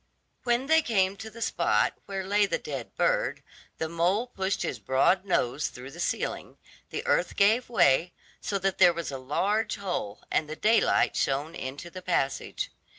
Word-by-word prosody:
When 240 +1 +2
they 320 +2 +5
came 195 -8 +1
to 220 - -7
the 230 +1 -6
spot - - +2
where 195 -1 -3
lay 205 +1 +3
the - - 0
dead - - -7
bird, - - +1 0.3
the 160 - -2
mole 175 +7 +1
pushed 195 -5 -2
his 125 - -3
broad 135 - +2
nose 145 -6 0
through 125 +2 -10
the 170 - -12
ceiling, - - -3 0.3
the - - -5
earth - - +1
gave 220 +5 +3
way, 170 - +3 0.3
so 200 - -1
that 195 0 -1
there 175 - +7
was 170 -3 -4
a 135 - -5
large 200 +12 0
hole, 175 - -4
and 155 - 0
the 155 - -4
daylight 225 +7 +3
shone 145 +4 0
into 140 +6 -7
the 185 - -8
passage. 170 -7 -1
185 Hz, 175 wpm, -28 LUFS, 150-210 Hz, 0.3 s, there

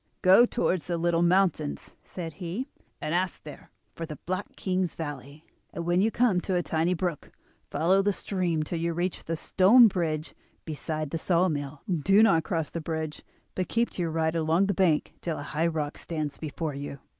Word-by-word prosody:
"'Go 195 +6 +7
towards 185 -9 0
the 175 -1 -1
little 170 0 +1
mountains,' 175 -4 +1
said 165 -3 -7
he, 185 +10 -3 0.3
'and 155 - -3
ask 180 0 -1
there 150 -2 -11 0.2
for 165 - -6
the 155 - -6
Black 185 +3 -4
King's 185 -2 -1
Valley, 145 -1 -7 0.3
and 170 - -5
when 175 +2 +2
you 220 - +3
come 225 -6 +2
to 185 - -1
a 175 - +1
tiny 165 +3 0
brook 175 -3 -3 0.4
follow 185 +4 +3
the 205 +1 +2
stream 180 -5 -1
till 165 +2 -4
you 170 0 -1
reach 175 +2 -2
the 165 - -2
stone 225 +9 +6
bridge 160 -5 -2 0.3
beside 155 -1 -4
the 165 - -2
saw 180 +2 +2
mill. 145 -2 -4
Do 195 +4 +4
not 165 -8 +4
cross 165 -4 -2
the 170 - -4
bridge, 160 -1 -4 0.3
but 185 - -3
keep 235 +1 +1
to - - -5
your 170 - 0
right 160 0 0
along 165 +3 +2
the 200 - 0
bank 175 -5 +2
till 165 -2 -3
a - - -5
high 160 +3 0
rock 155 -3 -3
stands 155 -4 -4
before 155 0 -4
you. 140 0 -6
170 Hz, 195 wpm, -27 LUFS, 155-185 Hz, 0.4 s, Go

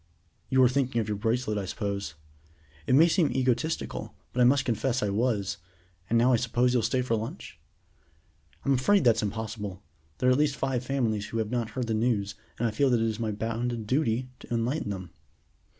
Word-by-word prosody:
"You 130 -1 +5
are - - +7
thinking 130 -2 0
of 110 - -1
your 105 -1 -2
bracelet, 110 0 0
I 100 - -3
suppose?" 100 -4 -4 0.7
"It 130 - +4
may 160 +4 +7
seem 165 -2 +2
egotistical, 130 +4 -1 0.2
but 125 - +1
I - - +7
must 130 +1 +4
confess 120 +2 0
I 105 - 0
was; 100 -3 0 0.5
and 115 - +3
now 125 +2 +4
I - - +5
suppose 120 +1 +1
you'll 125 - +3
stay 125 +3 0
to 115 -2 0
lunch?" 115 - -6 1.1
"I'm 140 - +3
afraid 170 +10 +3
that's 120 -3 +4
impossible. 105 -2 -4 0.3
There 125 - +2
are - - +5
at 130 - +3
least 150 -2 +2
five 130 -3 -1
families 115 -6 -1
who 115 - -4
have 110 -1 -1
not 120 -3 -1
heard 125 - 0
the 115 - -1
news, 110 -3 0 0.2
and 120 - +1
I - - -1
feel 135 +5 +2
that 120 -2 +3
it 115 - +1
is 110 -1 -2
my 110 -2 -1
bounden 115 +2 -2
duty 125 0 0
to - - -14
enlighten 120 +2 -1
them." 95 -4 -5
120 Hz, 205 wpm, -28 LUFS, 110-130 Hz, 1.1 s, are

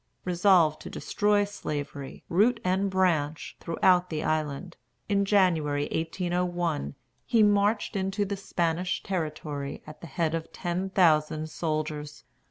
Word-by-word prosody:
Resolved 175 -4 +4
to - - -8
destroy 205 -1 +1
Slavery, 145 -8 -6
root 225 +7 +3
and 190 +2 +1
branch, 165 -5 0
throughout 180 +2 +2
the 155 -1 -3
island, 155 +3 -2 0.3
in 200 -1 +2
January, 160 -8 +2
1801, 175 -2 -1 0.3
he 230 -3 +3
marched 205 +2 +2
into 195 +1 0
the 200 +1 -3
Spanish 175 -2 -1
territory 150 -5 -4
at 155 0 -12
the 170 - -8
head 160 +2 -1
of 165 -1 -4
ten 180 +2 -3
thousand 155 -4 +2
soldiers. 155 -2 -3
175 Hz, 125 wpm, -27 LUFS, 155-190 Hz, 0.3 s, Resolved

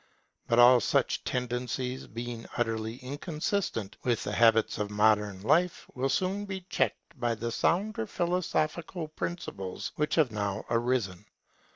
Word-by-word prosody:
But 115 - +2
all 120 +1 +8
such - - +1
tendencies, 125 +1 -2
being 115 0 -6
utterly 115 -1 -1
inconsistent 150 - -2
with 120 -3 +1
the - - -3
habits 115 0 +4
of 105 -1 -1
modern 105 -2 +2
life, 170 +9 +2
will 130 +1 -1
soon 190 +7 0
be 190 -1 -5
checked 140 - -1
by 120 -1 +1
the 115 +2 -3
sounder 180 - +1
philosophical 170 -2 -1
principles 155 - -5
which 150 0 +1
have 150 -8 +3
now 100 -1 -2
arisen. 115 -5 0
120 Hz, 135 wpm, -29 LUFS, 110-155 Hz, -, all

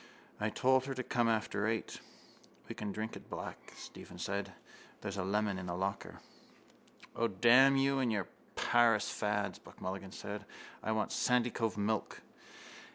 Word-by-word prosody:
I 105 - +1
told 130 +3 +3
her 135 -1 -3
to 130 - -2
come 120 -1 +1
after 105 -2 0
eight. 115 0 -2 0.7
—We - - -5
can 105 -1 -4
drink 110 +2 -4
it - - -11
black, - - -7
Stephen - - -10
said - - -2
thirstily. - - -19
There's 100 -1 -4
a 95 - 0
lemon 100 0 0
in 90 - -6
the 85 - -2
locker. 95 +2 -3 0.9
—O, 115 - +2
damn 125 +7 +6
you 135 0 +3
and 125 -3 +2
your 100 -4 0 0.3
Paris 115 -3 +4
fads! 105 0 -1
Buck - - -16
Mulligan 95 0 -5
said. 105 +1 -6 0.4
I 110 - -1
want 110 -1 0
Sandycove 120 -3 +1
milk. 105 +1 -1
110 Hz, 160 wpm, -34 LUFS, 100-120 Hz, 0.9 s, damn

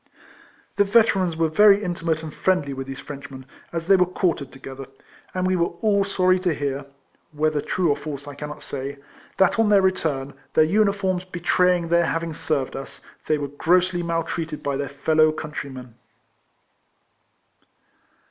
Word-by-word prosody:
The 205 - +5
Veterans 195 -5 +3
were 165 0 +2
very 205 +5 +5
intimate 165 -3 -2
and 155 -1 -7
friendly 180 -7 0
with 135 0 -6
these 135 0 -6
Frenchmen, 135 -2 -9 0.3
as 165 -1 -3
they 195 +2 +6
were 180 -1 +3
quartered 170 -6 -1
together; 135 0 -9 0.5
and 185 0 0
we 185 0 +2
were 170 -1 0
all 205 -2 +3
sorry 185 -1 +2
to 180 -4 0
hear 140 -1 -3 0.5
(whether 150 0 0
true 175 0 0
or - - +2
false 145 -1 -7
I 145 - -7
can 150 +1 -7
not 150 - -9
say) 140 +1 -5 0.4
that 190 +3 +3
on 225 -2 +4
their 200 -2 +5
return, 145 -7 0 0.2
their 155 - +6
uniforms 195 0 +1
betraying 180 -1 +1
their 170 0 +3
having 165 0 -2
served 145 -3 -2
us, 135 +1 -8 0.3
they 155 - +2
were 145 -1 -4
grossly 175 +5 +2
maltreated 165 -2 -3
by 140 -1 -1
their 140 0 -3
fellow 155 +2 +3
country 150 -2 -6
men. 125 -3 -10
165 Hz, 165 wpm, -23 LUFS, 140-185 Hz, 0.5 s, they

